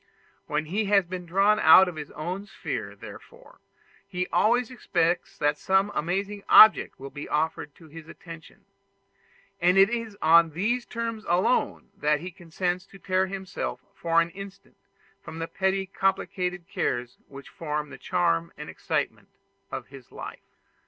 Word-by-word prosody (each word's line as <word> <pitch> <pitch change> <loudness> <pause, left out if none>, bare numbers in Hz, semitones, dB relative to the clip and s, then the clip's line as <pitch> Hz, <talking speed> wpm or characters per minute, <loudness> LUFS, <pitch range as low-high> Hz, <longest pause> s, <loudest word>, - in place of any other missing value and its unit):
When 155 - -1
he 200 +7 -1
has 200 -2 +3
been 180 0 -7
drawn 200 +5 +3
out 185 +3 +8
of 180 - -5
his 150 -2 -7
own 180 +6 -5
sphere, - - -5
therefore, 480 +1 -14 0.5
he 180 -2 -2
always 240 +3 +2
expects 175 -8 -1
that 145 0 0
some 190 +2 +2
amazing 200 +5 -2
object 215 0 +7
will 135 +1 -8
be 145 +1 -8
offered 150 -1 -2
to 165 - -17
his 160 +1 -12
attention; 165 -2 -13 1.0
and 180 +2 +4
it 195 +3 +6
is 230 -3 -4
on 165 0 +5
these 235 +8 -1
terms 230 -2 -4
alone 180 +8 0
that 150 0 +1
he 180 +4 -7
consents 175 +1 -3
to 195 - -15
tear 190 0 0
himself 190 -1 -5
for 165 0 +1
an 170 0 -3
instant 195 +1 -11 0.4
from 160 - -9
the 165 0 -4
petty 190 +1 -1
complicated 185 -2 -2
cares 120 0 -3
which 140 0 -12
form 150 -2 -4
the 135 - -10
charm 85 -6 0
and - - -8
the - - -6
excitement - - -3 0.4
of - - -6
his 135 -2 -14
life. - - -9
180 Hz, 160 wpm, -26 LUFS, 160-195 Hz, 1.0 s, out